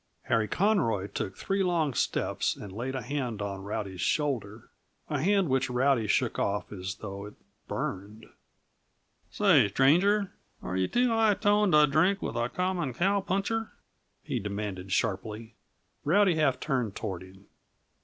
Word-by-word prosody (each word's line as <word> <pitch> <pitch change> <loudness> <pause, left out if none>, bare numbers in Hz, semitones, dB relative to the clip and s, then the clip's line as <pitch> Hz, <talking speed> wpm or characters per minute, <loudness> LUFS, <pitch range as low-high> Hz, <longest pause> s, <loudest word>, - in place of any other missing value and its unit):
Harry 115 -2 +1
Conroy 170 - +1
took 95 -1 -5
three 195 0 -1
long 170 -6 +1
steps - - 0
and 100 - -9
laid 125 +6 -4
a 130 - -3
hand 130 -7 -3
on 100 -2 -4
Rowdy's 100 -3 -4
shoulder 120 -8 -1 0.4
a 145 -3 0
hand 195 +2 +3
which 130 -1 +1
Rowdy 125 -2 +2
shook 120 +3 +1
off 100 +1 -1
as 95 -1 -5
though 100 -1 -6
it 105 - -13 0.3
burned. 105 +4 -5 1.0
"Say, 170 - +4
stranger, 180 - +3 0.3
are 90 - -4
you 95 0 +1
too 245 0 +2
high 225 -2 +3
toned 205 -2 +2
t' 150 0 +7
drink 165 +8 +2
with - - -4
a 120 0 0
common 180 -6 -2
cowpuncher?" 200 - 0 0.5
he - - -2
demanded 100 -2 -5
sharply. 110 +2 -2 0.5
Rowdy 190 +4 +4
half 150 -5 +1
turned 125 -8 -1
toward 95 -5 -4
him. 95 +1 -15
130 Hz, 145 wpm, -28 LUFS, -, 1.0 s, t